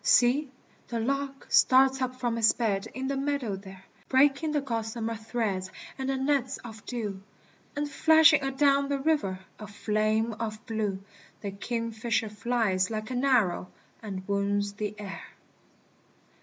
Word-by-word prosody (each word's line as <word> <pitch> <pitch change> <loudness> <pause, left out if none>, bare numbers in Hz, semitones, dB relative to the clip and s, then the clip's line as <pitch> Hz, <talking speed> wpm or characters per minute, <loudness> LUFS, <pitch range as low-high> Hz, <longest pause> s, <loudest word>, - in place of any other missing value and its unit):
See! 255 +4 +4 0.4
the 235 - -3
lark 275 +3 -2
starts 265 0 +5
up 255 0 -1
from 240 -2 -1
his 225 -1 +5
bed 210 -3 -1
in 260 +1 -3
the 275 - -1
meadow 275 -6 -1
there, 190 -1 -11 0.3
Breaking 275 +3 +3
the 300 - +1
gossamer 230 -3 -3
threads 220 -4 -2 0.3
and 265 0 -3
the 270 - 0
nets 265 -1 0
of 220 -2 -10
dew, 210 -6 -4 0.5
And 290 0 -1
flashing 315 +1 +6
a 270 - 0
down 280 0 +3
the 280 - +1
river, 270 -11 0 0.2
a 215 - -7
flame 215 +2 0
of 215 -1 -4
blue! 210 -4 -2 0.4
The 200 - -4
kingfisher 230 +1 -2
flies 210 -4 0
like 215 +1 -4
an 250 +1 -1
arrow, 220 -9 +2 0.3
and 195 -4 -6
wounds 200 0 0
the 210 0 -4
air. 200 -2 -6
230 Hz, 150 wpm, -28 LUFS, 210-270 Hz, 0.5 s, flashing